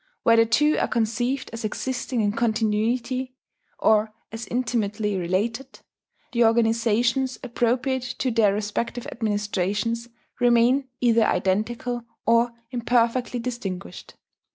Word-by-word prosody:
Where 230 - +5
the 230 0 +5
two 300 +7 +3
are - - +1
conceived 245 +3 -1
as 230 0 -6
existing 245 +2 -2
in 205 -1 +2
continuity, 230 +3 0 0.4
or 215 0 +3 0.2
as 225 +1 -6
intimately 220 -4 -1
related, 200 +8 -2 0.5
the 240 -2 +3
organizations 230 +2 +2
appropriate 250 +1 -1
to 255 - 0
their 225 -3 +4
respective 210 +4 -3
administrations 210 +1 -1 0.3
remain 245 +2 +3
either 230 -2 +4
identical 235 +5 -1 0.2
or 235 +1 +3 0.2
imperfectly 245 0 +1
distinguished 200 -7 -6
230 Hz, 105 wpm, -24 LUFS, 215-245 Hz, 0.5 s, Where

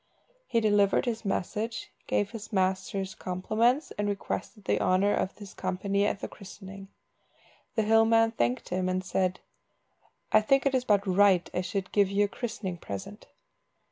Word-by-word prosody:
He 230 - +2
delivered 205 -2 +3
his 230 -2 -2
message, 210 +3 -3 0.2
gave 205 -1 0
his 225 -1 -8
master's 190 0 -1
compliments, 220 - 0
and 205 0 +1
requested 205 +1 -4
the - - +1
honour 190 +3 +3
of 185 - -1
his 205 -3 -10
company 195 +2 0
at 200 - -2
the - - -3
christening. 195 -1 -11 0.9
The 220 - +2
hill 225 +1 +5
man 225 0 +4
thanked 125 - -1
him, 185 0 -1
and 185 0 -1
said 185 -1 -1 0.9
"I 215 - +6
think 270 +6 +3
it 275 - +2
is 255 -1 +1
but 205 -3 +3
right 190 -1 +4
I 180 - 0
should 185 +1 -3
give 200 -2 +3
you 200 +1 +2
a - - -2
christening 200 -5 -5
present." 200 +5 -8
200 Hz, 165 wpm, -28 LUFS, 185-220 Hz, 0.9 s, I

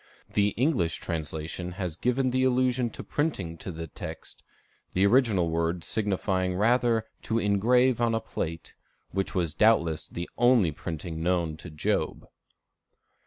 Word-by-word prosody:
The 100 -1 +3
English 120 - +2
translation 80 +2 -4
has 90 -3 -4
given 125 +4 +1
the 130 +1 +2
allusion 130 -1 +2
to - - -8
printing 100 - -2
to 95 - -6
the 85 0 -6
text, 80 - -9 0.5
the 95 +2 +3
original 100 -7 +3
word 85 +1 0
signifying 95 -2 -1
rather 115 +2 +3 0.2
to 115 - -1
ingrave 120 +4 +3
on 115 -1 +2
a - - +1
plate, 80 -7 -5 0.4
which 95 +2 -2
was 85 -4 0
doubtless 85 -5 +3
the 85 +1 -5
only 120 -8 +5
printing 80 +2 -5
known 85 -2 +1
to 75 - -9
Job. 75 -1 -1
95 Hz, 140 wpm, -27 LUFS, 85-120 Hz, 0.5 s, only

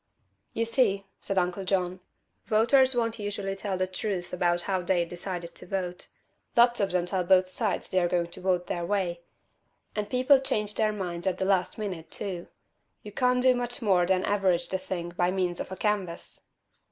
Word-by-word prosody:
"You 230 - 0
see," 225 -4 +2 0.2
said 195 - -3
Uncle 180 +1 0
John, 185 -1 0 0.5
"voters 255 +4 +4
won't 230 -1 0
usually 200 -1 -3
tell 195 -1 -3
the 185 - +1
truth 185 -1 -3
about 175 -1 +2
how 190 -2 0
they've 175 -1 +1
decided 175 -1 -5
to - - -10
vote. 180 -2 -3 0.5
Lots 240 0 +5
of 200 -2 +1
them 180 -1 +1
tell 180 0 -1
both 185 +1 +4
sides 205 +3 0
they're 185 -2 +2
going 170 -1 0
to - - -8
vote 180 -1 +1
their 175 -1 -3
way. 175 -2 -1 0.7
And 210 -1 -2
people 255 +3 +5
change 210 -5 -1
their 215 0 +1
minds 180 -3 -4
at 190 - +1
the 190 - -1
last 190 -2 +1
minute, 180 -7 -5
too. 180 -3 -5 0.6
You 210 - -8
can't 250 +2 +2
do 255 0 +6
much 245 -1 -3
more 185 -6 +3
than 185 0 +2
average 190 -4 +1
the 190 - -1
thing 180 -2 -4
by 175 0 0
means 180 -2 -1
of - - -5
a - - -4
canvass." 195 -5 -3
190 Hz, 190 wpm, -28 LUFS, 180-210 Hz, 0.7 s, do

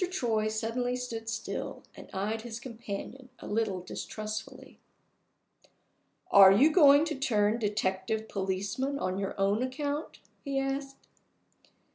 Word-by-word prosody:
Troy 230 -12 0
suddenly 230 +3 -1
stood 230 -3 -5
still, 225 0 -4
and - - -12
eyed 210 +4 -2
his 230 -1 -7
companion 235 +2 -7
a - - -11
little 205 -4 -1
distrustfully. 215 +4 -7 1.5
"Are 195 -1 +9
you 265 +11 +5
going 290 -3 +7
to 320 - -2
turn 220 -5 +1
detective 210 0 -1
policeman 200 +9 -2
on 185 -6 -2
your 195 0 -4
own 200 +3 +2
account?" 285 +4 -3 0.3
he 275 -2 -2
asked. 270 0 -3
225 Hz, 120 wpm, -30 LUFS, 205-265 Hz, 1.5 s, Are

